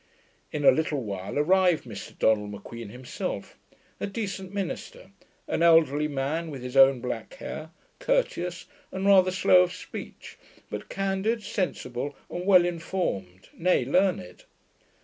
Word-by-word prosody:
In 145 -1 -2
a - - +9
little 145 -1 -1
while 100 +2 -5
arrived 180 +2 +3
Mr 105 -5 -9
Donald 105 -2 +2
M'Queen 105 +2 -8
himself; 125 +3 -5 0.4
a - - -2
decent 195 -2 -5
minister, 205 - -5 0.4
an - - -1
elderly 155 -3 +5
man 150 +4 -2
with 135 -4 -7
his 125 +1 -6
own 135 -2 +6
black 120 -3 -5
hair, 155 0 -7 0.3
courteous, - - -1 0.3
and 190 +1 -3
rather 190 -2 +6
slow 185 0 +5
of 180 -1 +1
speech, 180 - -9 0.3
but - - -6
candid, 195 +3 -1
sensible 145 -9 -3 0.2
and 180 +2 -4
well 185 -3 +7
informed, 165 - -3
nay 175 -7 +2
learned. 170 - 0
165 Hz, 135 wpm, -27 LUFS, 125-190 Hz, 0.4 s, a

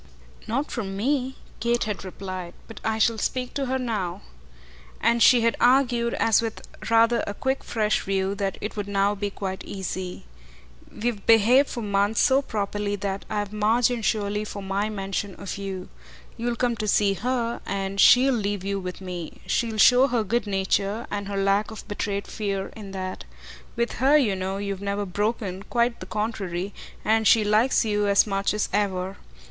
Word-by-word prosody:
"Not 275 +7 -1
from 195 -5 -4
me," 265 +3 0 0.2
Kate 235 +1 +1
had 210 -2 -4
replied. 185 -2 -7
"But 225 - -10
I 220 0 0
shall 220 0 +2
speak 250 +2 -2
to 275 -2 -2
her 260 +1 0
now." 215 - -3 0.8
And 235 0 +2
she 245 0 +7
had 230 0 +2
argued, 245 -2 +3
as 225 -1 +3
with 225 -1 -5 0.2
rather 230 0 +4
a 205 - -4
quick 265 +4 -1
fresh 215 -2 0
view, 195 0 -1
that 200 -1 -2
it 210 - -4
would 205 -1 -3
now 200 0 +2
be 205 0 -3
quite 190 -1 -5
easy. 190 - -5 0.7
"We've 220 -3 -3
behaved 230 +5 +6
for 235 - -4
months 205 +1 +1
so 265 +1 +4
properly 205 -4 -2
that 200 -1 -4
I've 205 -1 -2
margin 225 +3 +2
surely 210 -1 0
for 205 -1 -7
my 195 +2 -1
mention 195 -1 -3
of 200 0 -6
you. 190 -2 -5 0.5
You'll 240 +1 -2
come 240 -1 0
to 215 - -3
see 200 -1 +3
HER, 235 +3 -2
and 195 0 -3
she'll 260 +2 +7
leave 205 -4 -1
you 200 0 -2
with 180 0 -6
me; 180 -3 -6
she'll 225 -2 -1
show 250 +5 +6
her 240 -4 0
good 225 +2 -1
nature, 195 +3 0
and 205 -1 -3
her 200 0 -3
lack 195 +2 +2
of 220 -2 -9
betrayed 205 -1 -3
fear, 195 -2 -3
in 210 -3 -9
that. 185 -1 -5 0.5
With 235 0 0
her, 280 +3 +6
you 225 -9 +2
know, 190 +1 -3
you've 200 -1 -4
never 200 0 -2
broken, 200 0 -2
quite 235 +2 0
the 185 - -8
contrary, 200 -3 -3 0.3
and 220 0 +3
she 225 - +6
likes 215 +4 +3
you 210 -1 +1
as 200 0 +5
much 195 -1 0
as 210 - 0
ever. 190 -2 -1
210 Hz, 180 wpm, -25 LUFS, 195-235 Hz, 0.8 s, she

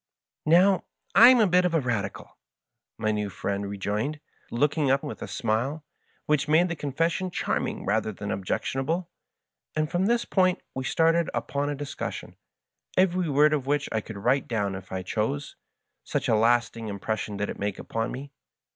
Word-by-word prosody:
" - - -66
Now, 180 +3 +5 0.3
I'm 245 +1 +9
a 220 - +6
bit 180 -1 +4
of 180 -2 +1
a - - +4
Radical," 115 -7 -3 0.6
my 110 - 0
new 105 -1 -1
friend 100 +1 -3
re 100 - -5
joined, 105 +10 -2 0.3
looking 145 +3 +1
up 135 +2 +2
with 150 - -6
a - - -4
smile, 135 +6 -1 0.4
which 150 -1 +1
made 165 +4 +4
the 170 - -2
confes 150 +3 0
sion 185 +1 -2
charming - - -2
rather 110 +1 +1
than 100 0 -5
objectionable; 135 - -2 0.6
and 155 0 0
from 180 +3 +1
this 235 +1 +2
point 185 -2 +2
we 130 0 -4
started 165 +2 +2
upon 145 0 -1
a 145 - -2
discussion, 145 0 -6 0.6
every 185 -2 +3
word 150 +2 +4
of 140 -3 -1
which 145 0 +1
I 110 - 0
could 110 0 -9
write 125 +7 +1
down 100 -4 -1
if 95 -1 -8
I 95 -1 -3
chose, 115 +9 -2 0.5
such - - -2
a - - +3
lasting 115 0 +2
impression 105 0 -3
did 105 +1 -2
it - - -9
make 100 -1 -2
upon 115 +1 -3
me. 140 +2 -7
140 Hz, 180 wpm, -26 LUFS, 110-165 Hz, 0.6 s, I'm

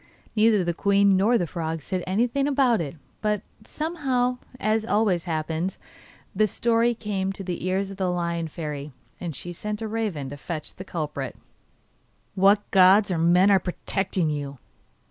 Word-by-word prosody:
Neither 215 -2 +4
the 170 0 0
queen 200 +2 +3
nor 215 +6 +4
the 180 - 0
frog 160 -2 -4
said 185 +2 -3
anything 240 +8 +1
about 260 -7 +3
it, 150 -1 -5 0.3
but 210 -1 0 0.2
somehow, 260 -4 -1 0.2
as 215 +1 +1
always 205 -6 +1
happens, 160 +2 -2 0.6
the 215 - +3
story 235 +3 +2
came 195 -3 -2
to 195 - -6
the 180 -1 -4
ears 190 +1 0
of 195 - -9
the 190 -2 0
Lion 170 -1 -1
Fairy, 150 -3 -6 0.3
and 170 -5 -5
she 175 +6 -6
sent 210 +4 -4
a 225 - -3
raven 210 -11 -2
to 145 - -7
fetch 155 +1 -6
the 185 - -8
culprit. 150 -7 -4 1.0
'What 200 +2 +4
gods 190 +2 +6
or 170 - 0
men 180 +4 +5
are 195 - +6
protecting 185 -2 -1
you? 140 -2 -4
190 Hz, 165 wpm, -25 LUFS, 170-215 Hz, 1.0 s, gods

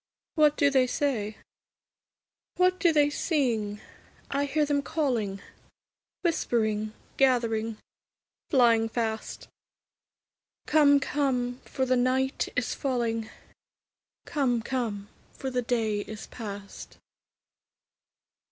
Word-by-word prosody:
What 300 -2 +4
do 285 0 +4
they 260 -2 +4
say? 230 -6 -1 1.2
What 365 0 +3
do 340 - +4
they 295 -2 +3
sing? 235 - 0 0.5
I 280 +1 +1
hear 300 +2 +1
them 285 -1 +1
calling, 235 -11 -1 0.8
Whispering, 215 - 0 0.2
gathering, 230 -4 +2 0.7
flying 230 -4 +4
fast, 225 -1 -3 1.2
'Come, 290 -2 +5
come, 255 -4 -1
for 265 - -1
the 255 0 +2
night 260 +2 +1
is - - 0
falling; 235 -5 -1 1.0
Come, 250 -6 0
come, 225 -6 -3 0.3
for 265 - -5
the 250 0 0
day 225 -3 0
is 215 +1 -7
past!' 200 -3 -8
250 Hz, 95 wpm, -28 LUFS, 220-285 Hz, 1.2 s, Come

